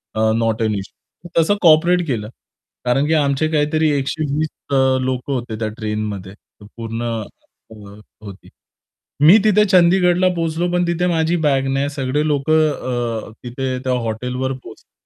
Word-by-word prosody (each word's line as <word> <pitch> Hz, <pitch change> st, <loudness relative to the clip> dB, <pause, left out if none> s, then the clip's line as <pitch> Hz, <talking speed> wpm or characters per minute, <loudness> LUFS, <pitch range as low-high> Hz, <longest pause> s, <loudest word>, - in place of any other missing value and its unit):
A, 110 Hz, 0 st, +2 dB
"not 115 Hz, 0 st, 0 dB
and 110 Hz, -1 st, 0 dB
issue" 100 Hz, -, -11 dB
तसं 205 Hz, +6 st, +2 dB
cooperate 170 Hz, +1 st, +4 dB
केलं. 110 Hz, -5 st, -3 dB, 0.6 s
कारण 135 Hz, +4 st, +1 dB
की 160 Hz, -, +1 dB
आमचे 145 Hz, 0 st, +1 dB
काहीतरी 155 Hz, 0 st, +1 dB
120 150 Hz, +2 st, -2 dB, 0.2 s
अ, -, -, +2 dB, 0.3 s
लोकं 130 Hz, +1 st, -2 dB
होते 120 Hz, -4 st, -4 dB
त्या 110 Hz, -, -1 dB
ट्रेनमध्ये 105 Hz, -3 st, -4 dB, 0.3 s
पूर्ण 115 Hz, +2 st, -7 dB
अ, 115 Hz, -1 st, -8 dB, 0.5 s
होती. 100 Hz, -2 st, -11 dB, 0.8 s
मी 175 Hz, +7 st, +9 dB
तिथे 210 Hz, -1 st, +4 dB
चंदीगडला 180 Hz, 0 st, +4 dB
पोहोचलो 165 Hz, +1 st, -1 dB
पण 175 Hz, 0 st, +1 dB
तिथे 170 Hz, +1 st, 0 dB
माझी 165 Hz, 0 st, +1 dB
बॅग 135 Hz, -1 st, +1 dB
नाही 140 Hz, +1 st, 0 dB
सगळे 140 Hz, +1 st, -2 dB
लोकं 155 Hz, +2 st, +2 dB, 0.6 s
अ, -, -, -14 dB
तिथे 130 Hz, +1 st, -3 dB
त्या 130 Hz, -1 st, 0 dB
हॉटेलवर 125 Hz, +4 st, -3 dB
पोहोचले 125 Hz, -4 st, -13 dB
140 Hz, 145 wpm, -19 LUFS, 115-160 Hz, 0.8 s, मी